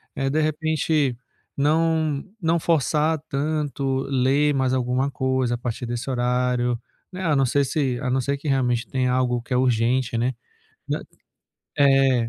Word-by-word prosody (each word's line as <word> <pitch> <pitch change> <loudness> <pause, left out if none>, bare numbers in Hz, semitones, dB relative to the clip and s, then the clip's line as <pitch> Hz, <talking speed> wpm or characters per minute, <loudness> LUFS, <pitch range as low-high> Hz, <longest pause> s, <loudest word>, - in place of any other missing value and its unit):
Eh, 135 0 -1
de 155 +3 +1
repente, 155 -3 0 0.4
não 155 0 +1 0.2
não 165 0 +2
forçar 155 0 +1
tanto 140 -2 -1
ler 140 +3 +2
mais 130 -1 +1
alguma 130 +2 0
coisa, 130 -2 0
a - - -5
partir 120 0 -4
desse 120 +3 -4
horário, 125 -1 0 0.3
né, 185 +1 -6
a 155 -3 +2
não 135 -1 +3
ser 140 +2 +2
se 130 -5 -1
a 130 - -1
não 130 +1 +1
ser 140 +2 -1
que 145 - -8
realmente 125 -3 +1
tenha 130 -2 0
algo 125 -1 +1
que 125 +2 -5
é - - +3
urgente, 120 0 +1
né. 125 +3 0 0.6
Né - - -1 0.8
É, 135 -4 +4
135 Hz, 160 wpm, -23 LUFS, 125-150 Hz, 0.8 s, É